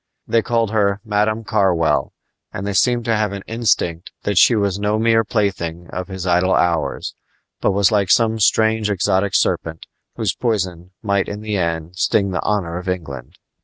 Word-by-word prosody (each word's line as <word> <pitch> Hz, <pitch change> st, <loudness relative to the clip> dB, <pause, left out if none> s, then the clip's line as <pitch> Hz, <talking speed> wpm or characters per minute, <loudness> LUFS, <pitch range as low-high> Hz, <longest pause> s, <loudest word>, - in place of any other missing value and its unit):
They 115 Hz, -, +2 dB
called 115 Hz, -2 st, 0 dB
her 100 Hz, -2 st, +1 dB
"Madam 110 Hz, +1 st, 0 dB
Carwell," 80 Hz, -9 st, +1 dB, 0.4 s
and 95 Hz, -, -5 dB
they 100 Hz, -, -2 dB
seemed 120 Hz, +3 st, +2 dB
to 115 Hz, -, +1 dB
have 105 Hz, -2 st, 0 dB
an 100 Hz, -1 st, -6 dB
instinct 110 Hz, -7 st, -1 dB
that 100 Hz, -3 st, +2 dB
she 120 Hz, -, +6 dB
was 100 Hz, -2 st, 0 dB
no 105 Hz, +1 st, 0 dB
mere 115 Hz, 0 st, +3 dB
plaything 90 Hz, -6 st, -2 dB
of 90 Hz, 0 st, -5 dB
his 95 Hz, -1 st, -6 dB
idle 90 Hz, +1 st, +2 dB
hours, 85 Hz, -2 st, 0 dB, 0.5 s
but -, -, +1 dB
was 100 Hz, +1 st, +3 dB
like 100 Hz, -3 st, +1 dB
some 115 Hz, -2 st, +3 dB
strange 110 Hz, +1 st, +2 dB
exotic 95 Hz, 0 st, 0 dB
serpent, 80 Hz, -1 st, 0 dB, 0.3 s
whose 110 Hz, -6 st, -1 dB
poison 90 Hz, -7 st, -2 dB
might 100 Hz, -2 st, 0 dB
in 105 Hz, +1 st, -6 dB
the 105 Hz, -1 st, -3 dB
end 85 Hz, -1 st, -2 dB
sting 100 Hz, 0 st, +1 dB
the 90 Hz, -, -2 dB
honor 90 Hz, -5 st, -1 dB
of 90 Hz, +1 st, -6 dB
England. 70 Hz, -9 st, -6 dB
100 Hz, 175 wpm, -19 LUFS, 90-110 Hz, 0.5 s, she